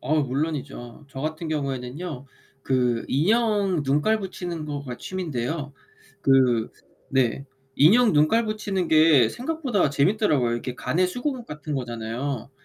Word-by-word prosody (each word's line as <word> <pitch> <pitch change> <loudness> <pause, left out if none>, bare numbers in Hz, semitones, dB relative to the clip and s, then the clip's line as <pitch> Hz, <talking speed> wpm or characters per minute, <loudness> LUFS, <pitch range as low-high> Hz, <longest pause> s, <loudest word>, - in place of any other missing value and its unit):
어 145 +5 0
물론이죠. 140 -2 -4
저 135 -1 -8
같은 155 +2 -4
경우에는요. 140 0 -4 0.4
그 125 -3 +1
인형 200 - +2
눈깔 150 +11 +2
붙이는 175 -4 -5
거가 140 -4 -5
취미인데요. 150 -5 -4 0.5
그 130 -4 +3 0.4
네, 130 0 +1 0.3
인형 215 - +6
눈깔 155 +10 +3
붙이는 205 -4 -2
게 155 -7 +5
생각보다 255 - -1
재밌더라고요. 140 - +2
이렇게 120 +1 -4
가내수공업 240 - -1
같은 150 0 -6
거잖아요. 120 +1 -4
150 Hz, 295 characters per minute, -24 LUFS, 130-185 Hz, 0.5 s, 인형